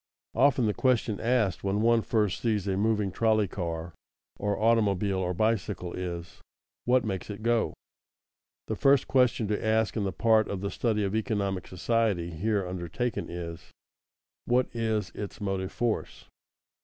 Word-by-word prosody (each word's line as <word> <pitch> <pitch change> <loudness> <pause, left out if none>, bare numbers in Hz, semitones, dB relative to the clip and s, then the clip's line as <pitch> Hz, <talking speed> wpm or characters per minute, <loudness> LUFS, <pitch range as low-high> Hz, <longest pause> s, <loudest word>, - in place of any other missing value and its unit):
Often 130 -1 +4
the 105 - +1
question 115 -5 +1
asked 115 -7 +1
when 100 +1 0
one 115 0 +4
first 105 -4 0
sees 105 -4 0
a 95 - +1
moving 105 -1 +1
trolley 110 -1 +2
car 85 -2 -4 0.5
or 100 0 0
automobile 105 -4 +2
or 90 -1 -1
bicycle 100 -4 -1
is: 85 -2 -6 0.4
What 125 -1 +3
makes 95 -2 -3
it 105 +1 -7
go? 115 -1 +1 0.9
The - - -3
first 140 -1 +4
question 125 -4 +3
to 105 - -1
ask 110 0 +1
in 110 - 0
the 95 - -1
part 110 +4 +3
of 95 -2 -4
the 100 0 -2
study 110 -3 0
of 100 +1 -1
economic 100 -4 -1
society 95 -3 0
here 100 +4 0
undertaken 90 +7 -3
is: 85 -1 -7 0.8
What 125 +1 +2
is 110 -2 -1
its 100 - -6
motive 95 -2 -2
force? 120 -2 -2
105 Hz, 155 wpm, -28 LUFS, 95-115 Hz, 0.9 s, Often